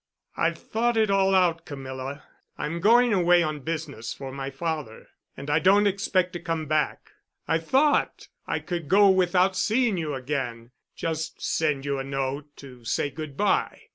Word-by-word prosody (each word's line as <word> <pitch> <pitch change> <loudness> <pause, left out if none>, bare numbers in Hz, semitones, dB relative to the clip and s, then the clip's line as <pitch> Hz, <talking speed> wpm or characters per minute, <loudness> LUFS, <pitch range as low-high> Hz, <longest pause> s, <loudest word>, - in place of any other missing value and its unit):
"I've - - 0
thought 235 +1 -1
it 215 -2 +3
all 195 -1 +3
out, 170 -3 +2
Camilla. 135 -1 -7 0.3
I'm 165 +3 -3
going 235 +4 +5
away 175 -2 +4
on 155 -2 -3
business 145 -6 -5
for 135 -1 -7
my 135 0 -5
father, 150 -4 -5 0.3
and 140 - -8
I 150 +2 +2
don't 195 +5 +4
expect 190 -2 +1
to 175 - -4
come 165 -2 -3
back. 155 0 -1 0.4
I 160 +2 +2
thought 270 - +1 0.2
I - - -1
could 170 -5 -5
go 200 +1 +6
without 185 0 +3
seeing 215 +2 +1
you 155 -4 -2
again—just 135 +4 -5
send 150 -4 0
you 140 -1 -1
a - - -3
note 135 +1 -3
to 125 -3 -13
say 130 +5 -1
good 150 -1 -8
by. 210 - +1
160 Hz, 165 wpm, -26 LUFS, 140-185 Hz, 0.4 s, go